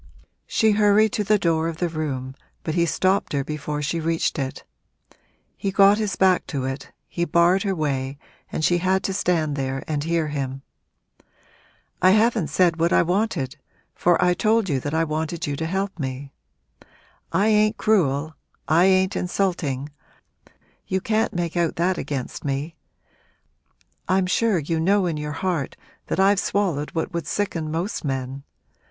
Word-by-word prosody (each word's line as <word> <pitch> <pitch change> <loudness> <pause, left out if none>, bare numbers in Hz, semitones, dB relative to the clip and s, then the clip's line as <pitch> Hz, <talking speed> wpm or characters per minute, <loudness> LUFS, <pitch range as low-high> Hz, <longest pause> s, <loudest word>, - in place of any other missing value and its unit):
She 220 -1 +3
hurried 210 +1 +4
to 210 - 0
the 210 +1 +3
door 165 -4 +1
of 165 -1 -4
the 175 - 0
room, 140 -5 -4 0.3
but 160 - -2
he 170 0 +2
stopped 185 +2 +1
her 140 -1 0
before 150 0 -4
she 165 +4 -1
reached 165 0 0
it. 135 -1 -4 0.9
He 200 - -2
got 195 +2 +5
his 210 -3 -1
back 185 -1 +3
to 135 -4 -3
it, 135 +1 -5 0.2
he 170 - -2
barred 170 +3 +3
her 195 -2 -1
way 140 -3 -2 0.3
and 155 - -1
she 175 0 +3
had 190 +2 +1
to 195 - -1
stand 165 -6 0
there 135 -1 -3
and 150 -2 -1
hear 165 -1 0
him. 135 -2 -4 1.4
'I 185 - +6
haven't 225 -6 +2
said 170 +2 +2
what 170 +1 +2
I - - +5
wanted 170 - -1 0.3
for 175 -1 +2
I 180 0 +4
told 215 0 +1
you 140 -3 +1
that 145 +4 -3
I 165 - +3
wanted 160 +1 -2
you 145 - -2
to 160 - -2
help 190 +1 -2
me. 135 0 -5 1.0
I 195 +6 +2
ain't 215 0 +3
cruel 160 -8 +1 0.3
I 165 +3 +4
ain't 190 0 +3
insulting 170 -7 -1 1.0
you 190 - 0
can't 220 +3 0
make 170 -1 -3
out 170 -2 +1
that 175 +2 0
against 135 -4 -4
me; 140 +3 -3 1.3
I'm 185 0 +3
sure 210 +2 +2
you 160 +1 -1
know 195 +4 +3
in 165 -3 -1
your 150 0 -4
heart 165 -2 -2 0.3
that - - -2
I've 195 +1 +4
swallowed 180 -9 0
what 165 +3 -2
would 170 -1 -3
sicken 170 -6 -2
most 170 +7 -3
men. 135 -1 -3
170 Hz, 165 wpm, -23 LUFS, 150-190 Hz, 1.4 s, I